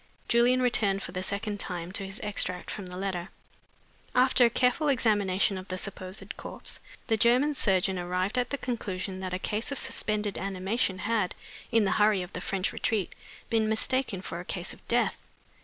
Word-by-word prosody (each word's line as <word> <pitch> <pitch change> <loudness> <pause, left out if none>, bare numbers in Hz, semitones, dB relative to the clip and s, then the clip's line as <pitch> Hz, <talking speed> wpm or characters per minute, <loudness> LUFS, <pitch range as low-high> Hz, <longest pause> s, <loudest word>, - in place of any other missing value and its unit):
Julian 245 +2 +4
returned 200 -5 +2
for - - -5
the 185 - -3
second 205 +2 -2
time 175 -2 -4
to 195 0 -3
his 195 +2 -7
extract 185 -3 0
from 195 -3 -5
the 180 0 -7
letter: 190 -2 -3 0.9
"'After 255 0 +5
a 235 - +6
careful 250 +6 +2
examination 205 -7 +2
of 185 - -10
the 185 - -3
supposed 185 0 -5
corpse, - - -4 0.3
the 225 - +2
German 250 +7 +4
surgeon 190 -6 +2
arrived 180 +6 0
at 245 0 0
the 280 - -2
conclusion 195 -7 -3
that 185 -1 -4
a - - 0
case 210 +6 -2
of 280 - -1
suspended 210 -3 0
animation 195 +1 -1
had 215 -4 +1 0.4
(in 225 -2 +4
the 195 - +1
hurry 210 -3 +4
of 180 - -10
the 180 - -4
French 195 0 -1
retreat) 210 -5 0 0.4
been 220 -1 +2
mistaken 220 -3 +1
for 170 - -4
a - - -6
case 180 0 -3
of - - -16
death. - - +2
200 Hz, 185 wpm, -29 LUFS, 185-230 Hz, 0.9 s, a